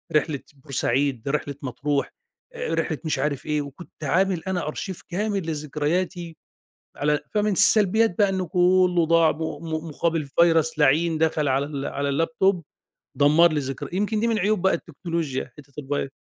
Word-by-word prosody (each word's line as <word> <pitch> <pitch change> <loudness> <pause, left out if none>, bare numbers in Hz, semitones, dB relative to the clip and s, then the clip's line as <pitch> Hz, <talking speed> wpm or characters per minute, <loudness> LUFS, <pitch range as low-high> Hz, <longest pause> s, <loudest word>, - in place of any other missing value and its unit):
رحلة 150 -2 +1
بورسعيد، 135 -2 -1
رحلة 145 -1 -2
مطروح، 140 +2 -2 0.4
آآ، 480 0 -3
رحلة - - -1
مش 155 -4 -1
عارف 140 -1 -2
إيه، 150 -1 0
وكنت 145 +3 -11
عامل 180 +2 +1
أنا 180 -4 -2
أرشيف 185 +4 -5
كامل 195 -1 -2
لذكرياتي، 160 +3 -2 0.6
على 150 +1 +1
فمن 210 0 +2
السلبيات 205 0 +4
بقى 205 -2 +4
إنه 190 -1 -1
كُلّه 180 0 +3
ضاع 165 -1 +4
م - - -12 0.2
م 160 0 -4
مقابل 160 0 -1
فيرس 160 +1 +2
لعين 155 +3 +3
دخل 155 -2 +1
على 135 +2 +1
ال 140 -2 -4
على 140 0 -2
اللاب 160 +4 -1
توب 190 -3 +3 0.5
دمّر 155 +4 +5
لي 150 - +1
ذكر 135 -2 -5
يمكن 210 +3 0
دي 230 - +1
من 225 -2 +1
عيوب 200 0 +1
بقى 190 - +3
التكنولوجيا 165 -5 -4
حتة 140 -2 -15
الفيرس. 145 -1 -2
160 Hz, 165 wpm, -24 LUFS, 145-180 Hz, 0.6 s, دمّر